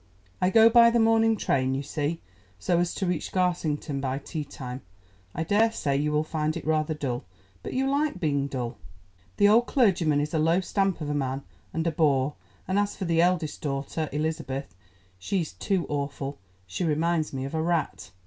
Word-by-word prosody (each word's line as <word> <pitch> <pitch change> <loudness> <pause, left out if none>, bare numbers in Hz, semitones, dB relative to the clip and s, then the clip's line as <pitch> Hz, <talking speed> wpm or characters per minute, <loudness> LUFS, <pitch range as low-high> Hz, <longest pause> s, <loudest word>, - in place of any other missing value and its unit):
I 180 - +4
go 225 +3 +7
by 235 0 +7
the 235 0 +2
morning 225 0 +4
train, 130 -7 +1
you 135 - -2
see, 150 +3 -3 0.4
so 170 - +1
as 175 0 0
to 195 - -1
reach 180 -3 -2
Garsington 160 -6 -1
by 135 0 -1
tea 150 +2 -5
time. 130 -2 -7 0.5
I 160 - -1
daresay 205 -6 +1
you 150 +2 0
will 150 +1 +2
find 155 0 -2
it 165 - -7
rather 155 0 +1
dull, 130 -5 -3 0.4
but - - -6
you 265 +1 +1
like 285 -6 0
being 145 -4 0
dull. 125 -4 -4 0.6
The 205 - +6
old 230 +4 +5
clergyman 175 - +3
is 150 +2 -2
a 160 - +2
low 165 +3 +3
stamp 195 -1 0
of 145 -1 -2
man, 135 -1 -2 0.3
and 165 - -2
a 165 - +2
bore, 145 -3 +2 0.3
and 190 +2 +1
as 205 0 0
for 190 - -4
the 165 -1 +2
eldest 175 -3 +1
daughter, 145 +2 -3
Elizabeth, 145 - -3 0.5
she's 170 - -2
too 190 -4 -1
awful—she 135 - -5
reminds 160 0 +1
me 135 -1 -4
of 140 - -6
a 160 - 0
rat. 165 -8 -1
155 Hz, 185 wpm, -27 LUFS, 140-180 Hz, 0.6 s, go